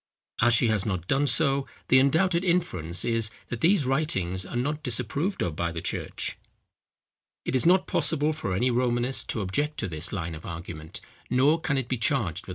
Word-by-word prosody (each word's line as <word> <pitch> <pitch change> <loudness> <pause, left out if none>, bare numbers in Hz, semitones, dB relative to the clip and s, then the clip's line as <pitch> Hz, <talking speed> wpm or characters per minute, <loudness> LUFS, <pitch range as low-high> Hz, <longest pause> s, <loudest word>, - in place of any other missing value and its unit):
As 120 0 +5
she 115 +1 +3
has 105 -3 +1
not 95 -5 -3
done 140 +7 +1
so, 135 +1 +2 0.2
the 130 - +7
undoubted 170 +6 +2
inference 95 - 0
is, 115 -2 +1 0.2
that 120 -1 -5
these 170 -4 +3
writings 95 - -1
are - - -7
not 145 +5 -1
disapproved 140 - -1
of 85 -4 -2
by 85 +1 -1
the 80 - -4
church. - - -4 1.1
It - - -1
is 130 - +3
not 185 +1 +5
possible 155 -1 +1
for 100 -12 -3
any 125 +6 +2
Romanist 120 +1 0
to 110 - -1
object 145 +11 -1
to 105 - -2
this 80 -3 0
line 85 -4 -4
of 80 - -9
argument; 80 -2 -7 0.3
nor 140 +6 +3
can 150 -3 0
it 130 -3 -2
be 130 - -1
charged 140 +4 +2
with - - 0
unfairness. 95 -3 -5
125 Hz, 195 wpm, -26 LUFS, 95-150 Hz, 1.1 s, the